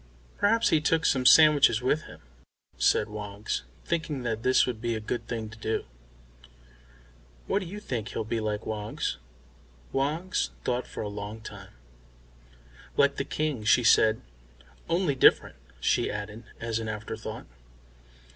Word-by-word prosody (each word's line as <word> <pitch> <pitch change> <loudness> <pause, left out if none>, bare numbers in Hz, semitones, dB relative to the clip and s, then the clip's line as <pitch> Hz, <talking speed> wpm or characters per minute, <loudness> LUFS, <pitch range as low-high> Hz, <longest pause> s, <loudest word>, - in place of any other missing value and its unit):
"Perhaps 225 +3 +3
he 155 - +3
took 165 +1 +1
some 130 -1 +3
sandwiches 145 -6 +7
with 140 +5 0
him," - - -13 0.5
said 105 - +2
Woggs, 105 - -4 0.2
thinking 160 -6 -2
that 115 -2 -2
this 130 +2 +4
would 120 -4 -4
be 120 -1 -1
a - - -2
good 110 +3 -4
thing 115 -2 -4
to 115 - -13
do. 110 0 -2 1.6
"What - - +1
do 185 - -6
you 205 +5 -7
think 120 - -4
he'll 115 - -3
be 110 +1 -2
like, 105 -1 -3
Woggs?" 105 - -3 0.7
Woggs 155 +7 -1
though 125 0 0
for - - -7
a - - -3
long 105 +1 -6
time. - - -10 1.3
"Like 140 0 +3
the - - 0
King," 150 -6 -2
she 120 +3 +4
said. 110 -1 +5 0.7
"Only 170 -3 +2
different," 130 - +4 0.2
she - - +1
added, 105 +2 -6
as 115 -1 -2
an 110 -1 -4
afterthought. 110 +1 -6
120 Hz, 145 wpm, -27 LUFS, 110-150 Hz, 1.6 s, sandwiches